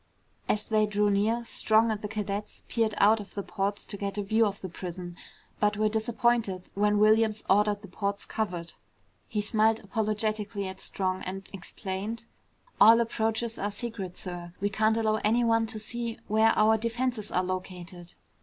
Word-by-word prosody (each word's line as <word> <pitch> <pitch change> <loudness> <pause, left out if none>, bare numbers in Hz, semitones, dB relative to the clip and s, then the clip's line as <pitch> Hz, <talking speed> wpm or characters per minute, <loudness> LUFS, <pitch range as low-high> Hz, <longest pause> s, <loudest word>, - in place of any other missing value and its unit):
As 210 0 +1
they 215 -1 +2
drew 210 0 +2
near, 220 +4 +1
Strong 220 0 +3
and 215 -1 -3
the 210 - -3
cadets 210 -1 -4
peered 225 -3 0
out 215 +2 +5
of 205 - -10
the 200 - -3
ports 200 +1 -2
to 200 - -7
get 200 0 -4
a 205 - 0
view 220 +2 +3
of 200 0 -5
the 190 - -4
prison, 175 0 -7 0.4
but 210 0 +2
were 215 0 +2
disappointed 220 -3 0
when 210 +1 +2
Williams 215 0 +4
ordered 205 +1 +3
the - - -8
ports 200 +2 -3
covered. 175 -6 -3 0.5
He 210 - -1
smiled 220 +1 +2
apologetically 215 0 -1
at 190 0 -7
Strong 185 -1 -1
and 195 +1 -6
explained, 195 +4 -5 0.5
"All 225 +2 +8
approaches 225 0 -1
are 205 - -1
secret, 205 -4 -5
sir. 175 -2 -6
We 205 - 0
can't 220 +2 +2
allow 215 -1 +2
anyone 225 +1 +3
to 220 - -5
see 230 +1 -4
where 220 +1 +4
our 220 +1 +5
defenses 235 -1 -2
are 180 - +1
located." 180 -1 -6
210 Hz, 170 wpm, -28 LUFS, 195-220 Hz, 0.5 s, All